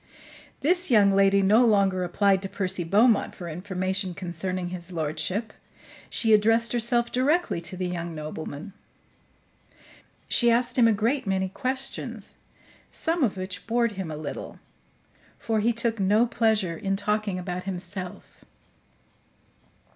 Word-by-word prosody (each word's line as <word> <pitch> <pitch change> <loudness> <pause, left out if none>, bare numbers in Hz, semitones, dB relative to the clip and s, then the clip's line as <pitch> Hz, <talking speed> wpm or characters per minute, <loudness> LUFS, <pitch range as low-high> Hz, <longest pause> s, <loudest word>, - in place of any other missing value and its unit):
This 355 +3 +3
young 210 -5 +5
lady 195 0 +4
no 215 +5 +5
longer 195 -5 +3
applied 190 +2 +2
to 195 - -5
Percy 185 -4 -2
Beaumont 210 +6 +3
for 175 - -8
information 185 +2 -3
concerning 185 0 -4
his 180 0 -8
lordship. 165 +7 -2 0.6
She 225 -2 +1
addressed 225 +2 +3
herself 235 0 +1
directly 285 - +1
to 185 - -4
the 185 - -2
young 170 -2 -4
nobleman. 155 +3 -7 1.5
She 240 - +3
asked 240 +1 +2
him 240 -3 +5
a - - +4
great 225 +4 0
many 190 -1 0
questions, 260 +5 -2 0.6
some 330 -1 -1
of 210 -6 0
which 185 -1 -6
bored 235 0 +1
him 190 -4 -5
a 155 - -5
little; 150 -1 -7 0.8
for 220 -1 -1
he 225 +3 +2
took 230 -1 0
no 205 +4 +3
pleasure 220 -7 +1
in 195 +3 -2
talking 210 -1 -1
about 180 0 -5
himself. 185 0 -7
195 Hz, 135 wpm, -26 LUFS, 180-230 Hz, 1.5 s, young